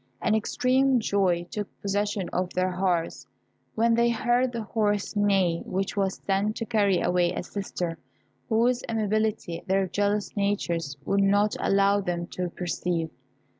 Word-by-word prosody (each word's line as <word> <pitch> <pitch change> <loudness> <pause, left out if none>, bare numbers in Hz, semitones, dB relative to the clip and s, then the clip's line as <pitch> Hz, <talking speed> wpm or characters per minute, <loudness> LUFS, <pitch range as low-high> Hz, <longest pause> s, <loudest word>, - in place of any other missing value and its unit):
An 220 - +1
extreme 255 +4 +2
joy 190 -5 +1
took 205 -2 -3
possession 205 -1 -1
of 180 0 -1
their 185 0 +1
hearts 180 -2 -1 0.5
when 230 +1 +3
they 235 +1 +3
heard 240 +2 +1
the 230 -2 -4
horse 205 -1 -1
neigh 195 -5 +2
which 190 +1 -3
was 195 -2 -1
sent 200 +2 +1
to 230 - -3
carry 205 -5 +2
away 175 -1 +2
a 180 - -4
sister 175 -4 -4 0.5
whose 240 +3 +2
amiability 215 -5 -1
their 190 0 +2
jealous 205 +2 -1
natures 170 -8 -1
would 200 0 +2
not 205 +1 +3
allow 200 +1 +3
them 175 -2 -2
to 180 0 -4
perceive. 170 -2 -2
200 Hz, 145 wpm, -26 LUFS, 180-215 Hz, 0.5 s, when